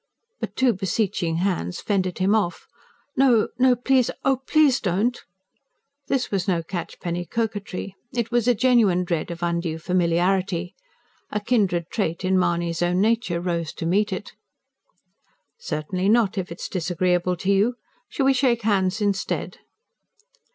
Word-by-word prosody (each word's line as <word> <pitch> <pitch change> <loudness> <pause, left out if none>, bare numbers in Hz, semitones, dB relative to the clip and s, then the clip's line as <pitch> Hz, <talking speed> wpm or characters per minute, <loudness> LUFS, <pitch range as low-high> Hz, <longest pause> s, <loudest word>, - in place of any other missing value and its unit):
But - - -5
two 260 -2 +3
beseeching 185 -3 -1
hands 170 - -1
fended 185 -3 -1
him 190 +2 +2
off. 205 -5 0 0.5
"No... 250 -5 +4
no. 255 0 +5
Please... 255 +1 +2 0.2
oh, 270 -1 +3
PLEASE, 275 0 +3
don't!" 210 +6 0 0.8
This 265 -2 -1
was 195 -2 -1
no 170 -3 +1
catchpenny 175 0 -4
coquetry; 205 -3 -3 0.2
it 235 -1 -2
was 240 -1 +1
a 245 - +4
genuine 220 -7 +3
dread 170 -2 -2
of 170 0 -6
undue 170 -1 -1
familiarity. 180 +1 0 0.6
A 210 - -1
kindred 200 -7 0
trait 185 -4 -2
in 185 0 +3
Mahony's 170 -1 0
own 175 +1 +1
nature 220 -4 +1
rose 170 -2 -2
to - - -5
meet 200 +5 +1
it. 190 +2 -5 1.3
"Certainly 185 - -2
not, 220 -2 +3
if 185 -3 -4
it 170 - -8
is - - -3
disagreeable 180 0 0
to 190 +3 0
you. 205 +5 +2 0.3
Shall 275 - -1
we 270 - +5
shake 250 -3 +1
hands 200 -1 +1
instead?" 200 -2 -2
190 Hz, 145 wpm, -23 LUFS, 175-230 Hz, 1.3 s, no